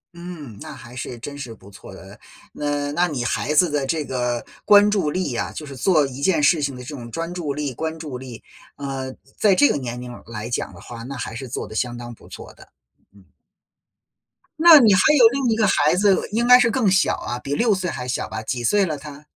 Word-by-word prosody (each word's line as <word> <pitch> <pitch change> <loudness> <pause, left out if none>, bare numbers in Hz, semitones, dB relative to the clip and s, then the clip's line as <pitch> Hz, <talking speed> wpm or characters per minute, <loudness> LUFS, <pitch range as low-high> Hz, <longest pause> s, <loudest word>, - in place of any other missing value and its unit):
嗯， 170 - -9
那 - - -8
还 120 +1 -12
是 125 -1 -6
真 140 +5 -8
是 125 -5 -8
不 100 -1 -17
错 95 - -13
的， - - -13 0.3
那 145 -1 -2
那 175 +4 +1
你 130 -6 -3
孩 145 - -1
子 165 0 +4
的 145 -2 0
这 155 +1 -1
个 125 -2 -2 0.2
关 205 0 +6
注 195 -8 +1
力 165 -5 -2
啊， - - -2
就 155 - -7
是 140 -2 -9
做 155 +3 +3
一 135 +1 -7
件 165 -2 +2
事 160 0 +4
情 140 -2 -2
的 125 - -9
这 125 - -9
种 120 -2 -9
专 165 +7 -5
注 170 -5 -3
力、 145 -3 -3
关 160 +4 -4
注 145 -6 -7
力， 125 -3 -10 0.3
呃， 135 -2 -5 0.3
在 205 -3 +4
这 145 -5 +5
个 - - 0
年 125 -3 -5
龄 125 0 -8 0.2
来 110 -1 -6
讲 - - -2
的 - - -14
话， 115 -1 -10
那 135 +3 -7
还 115 -1 -5
是 130 +1 -6
做 120 - -5
得 110 - -11
相 120 +2 -2
当 120 0 -8
不 - - -17
错 - - -11
的。 - - -18 0.4
嗯。 100 -2 -21 1.3
那 325 -2 +9
你 225 -6 +5
还 185 - +4 0.2
有 240 -4 +8
另 265 0 -1
一 225 - +2
个 220 -1 +2
孩 150 -2 +3
子 195 0 +2
应 235 +3 0
该 250 0 +9
是 240 -2 +3
更 230 -4 +1
小 190 0 +3
啊， 120 - -5
比 140 +2 -3
6 230 +2 +2
岁 185 -2 -2
还 125 -4 -5
小 125 - -3
吧， 110 0 -5
几 120 +2 -3
岁 200 - +3
了 155 -4 -3
他？ 145 +1 -11
145 Hz, 255 characters per minute, -22 LUFS, 125-180 Hz, 1.3 s, 那